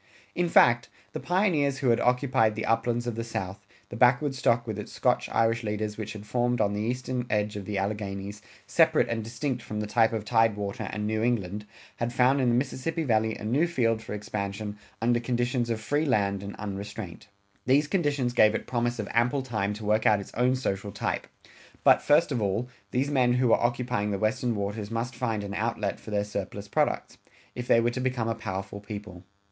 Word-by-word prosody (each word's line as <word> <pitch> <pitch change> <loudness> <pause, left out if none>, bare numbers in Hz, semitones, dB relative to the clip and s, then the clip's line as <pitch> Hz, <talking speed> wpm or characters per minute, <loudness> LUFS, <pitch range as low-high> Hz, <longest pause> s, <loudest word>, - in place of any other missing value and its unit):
In 175 -1 0
fact, 120 -7 +5 0.2
the - - -3
pioneers 165 -7 +1
who 135 -2 +1
had 115 0 +4
occupied 125 -3 +2
the 110 - -3
uplands 120 +1 +1
of 120 - -2
the 115 +1 -3
South, 100 -3 -5 0.2
the - - -7
backwoods 130 +3 +3
stock 115 -1 +2
with 110 -3 -4
its 105 - -7
Scotch - - +1
Irish 115 0 +2
leaders 105 0 -2
which 110 -2 -5
had 105 -1 -9
formed 120 +2 0
on 100 - +2
the 105 - -2
eastern 125 +2 -2
edge 105 0 0
of 100 -2 -5
the 105 0 -3
Alleghanies, 100 0 -3 0.2
separate 160 +10 +4
and 115 -1 -2
distinct 120 +3 -3
from 105 -1 -5
the 105 - -2
type 115 +1 +3
of 110 -2 -3
tidewater 105 -3 +1
and 105 +1 -3
New 110 0 0
England, 105 -3 -1 0.3
had 120 0 -1
found 130 +3 +3
in 125 - +3
the 120 - +3
Mississippi 145 +5 -1
Valley 110 -4 +1
a - - -9
new 140 +10 +2
field 115 -9 +1
for 110 - -7
expansion 105 0 -4 0.3
under 120 0 +3
conditions 120 0 -1
of 115 -1 -1
free 145 +7 0
land 100 -5 +1
and 100 0 -7
unrestraint. 100 -1 -6 0.4
These 140 +3 +4
conditions 145 -8 0
gave 110 -3 +5
it - - -3
promise 120 0 -1
of 105 -3 -3
ample 125 +4 +2
time 110 -6 -1
to 105 0 -8
work 110 +1 +2
out 105 -1 +5
its 100 - -9
own 125 +2 +2
social 100 -5 -2
type. - - -3 0.6
But, - - +6
first 150 +2 +4
of 125 -4 0
all, 105 +4 0 0.2
these 135 +6 0
men 125 -3 +3
who 125 -1 +2
were - - +4
occupying 120 -3 0
the 100 - -1
Western 115 +3 0
Waters 100 +1 -3
must 115 +2 -3
find 110 -3 -1
an 100 0 -5
outlet 105 -1 -2
for - - -11
their 105 -1 0
surplus 100 0 -5
products, - - -1 0.3
if 125 0 -6
they 115 - +5
were 120 +1 +2
to 130 - -3
become 125 -3 -1
a 115 - +1
powerful 100 -3 -5
people. 100 -4 -8
115 Hz, 205 wpm, -27 LUFS, 105-125 Hz, 0.6 s, But